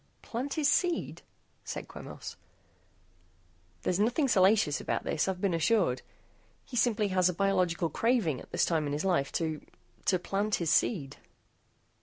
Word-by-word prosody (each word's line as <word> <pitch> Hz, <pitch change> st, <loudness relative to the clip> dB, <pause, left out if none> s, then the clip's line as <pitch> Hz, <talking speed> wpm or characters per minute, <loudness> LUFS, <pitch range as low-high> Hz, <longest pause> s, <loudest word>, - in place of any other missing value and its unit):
"Plant 260 Hz, +4 st, -4 dB
his 305 Hz, -3 st, +2 dB
seed?" 295 Hz, -, 0 dB, 0.4 s
said -, -, -6 dB
Quemos. -, -, -9 dB, 1.5 s
"There's 180 Hz, +1 st, 0 dB
nothing 245 Hz, +7 st, +2 dB
salacious 195 Hz, -, +3 dB
about -, -, -2 dB
this, 155 Hz, -, 0 dB
I've 190 Hz, -1 st, -2 dB
been 195 Hz, -2 st, 0 dB
assured. 165 Hz, -, +2 dB, 0.6 s
He 250 Hz, -, -9 dB
simply 225 Hz, -3 st, +2 dB
has 185 Hz, -1 st, +3 dB
a 180 Hz, -, -3 dB
biological 180 Hz, -4 st, +1 dB
craving 225 Hz, -, +1 dB
at -, -, -14 dB
this -, -, +2 dB
time 160 Hz, -3 st, 0 dB
in 145 Hz, -, -2 dB
his 150 Hz, +5 st, -2 dB
life 170 Hz, -8 st, +1 dB
to 160 Hz, -2 st, -2 dB, 0.4 s
to 185 Hz, -, +3 dB
plant 200 Hz, +4 st, -1 dB
his 165 Hz, -3 st, -1 dB
seed." 150 Hz, -, +1 dB
185 Hz, 150 wpm, -30 LUFS, 165-220 Hz, 1.5 s, salacious